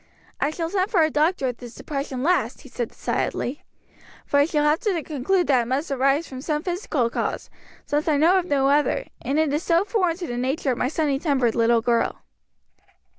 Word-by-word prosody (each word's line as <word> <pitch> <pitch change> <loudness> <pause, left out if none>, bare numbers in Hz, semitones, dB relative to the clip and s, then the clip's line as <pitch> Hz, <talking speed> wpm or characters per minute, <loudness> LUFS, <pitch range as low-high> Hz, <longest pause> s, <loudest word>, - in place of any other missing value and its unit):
"I - - +1
shall 330 +1 -4
send 385 0 0
for 355 -7 +3
a 310 - +1
doctor 300 -1 +1
if 245 - -6
this 245 -2 -11
depression 275 -3 -4
lasts," 295 -8 +1
he 270 - -13
said 240 -2 -3
decidedly, 270 +5 -3 0.6
"for 285 - +1
I 285 - +5
shall 300 -2 0
have 300 +2 +3
to 365 -7 -1
conclude 325 +6 0
that 260 -4 +3
it 230 - -4
must 280 +5 -2
arise 275 +4 +2
from 260 -1 -8
some 300 +1 -2
physical 350 - -1
cause, - - -3 0.3
since 295 +2 -1
I 305 -2 +3
know 345 +6 +5
of 355 - -3
no 280 -5 +2
other; 295 - +2 0.2
and 280 - -1
it 310 -2 +2
is 300 - 0
so 340 +1 +2
foreign 370 -6 0
to 360 - -5
the 240 -6 -4
nature 265 +2 0
of 245 - -3
my - - +1
sunny 290 -1 0
tempered 265 -7 +1
little 230 0 +3
girl." 235 0 0
295 Hz, 215 wpm, -23 LUFS, 260-335 Hz, 0.6 s, I